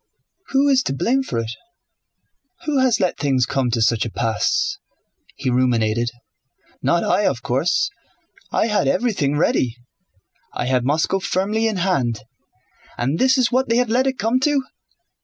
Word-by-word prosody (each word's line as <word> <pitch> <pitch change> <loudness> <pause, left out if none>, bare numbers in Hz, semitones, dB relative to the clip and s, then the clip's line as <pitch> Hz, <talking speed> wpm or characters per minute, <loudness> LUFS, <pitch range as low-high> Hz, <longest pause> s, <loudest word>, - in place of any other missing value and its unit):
"Who 275 +1 +2
is 270 -2 +4
to - - -1
blame 260 - +1
for 260 - -4
it? 115 -1 -2 1.1
Who 295 -3 +1
has 255 -3 +3
let 185 -3 0
things 135 -4 +2
come 130 -1 -1
to 115 -1 +1
such 115 -1 +2
a 115 - -3
pass?" 115 0 -1 0.6
he 130 - -2
ruminated. 120 -2 +1 0.7
"Not 170 - +1
I, 205 - +2
of 120 -4 -2
course. 150 - +1 0.6
I - - +2
had 210 -2 +1
everything 210 - 0
ready. 125 -6 +1 0.8
I - - -2
had 125 -1 +1
Moscow 160 +7 +1
firmly 205 +4 0
in 220 - -1
hand. 135 - 0 0.8
And 135 +7 -1
this 260 +1 +4
is 255 -2 +2
what 255 0 +1
they 230 - +3
have 245 -2 +1
let 255 +4 +2
it 265 -1 -1
come 230 +4 +1
to! 280 0 +1
175 Hz, 160 wpm, -21 LUFS, -, 1.1 s, is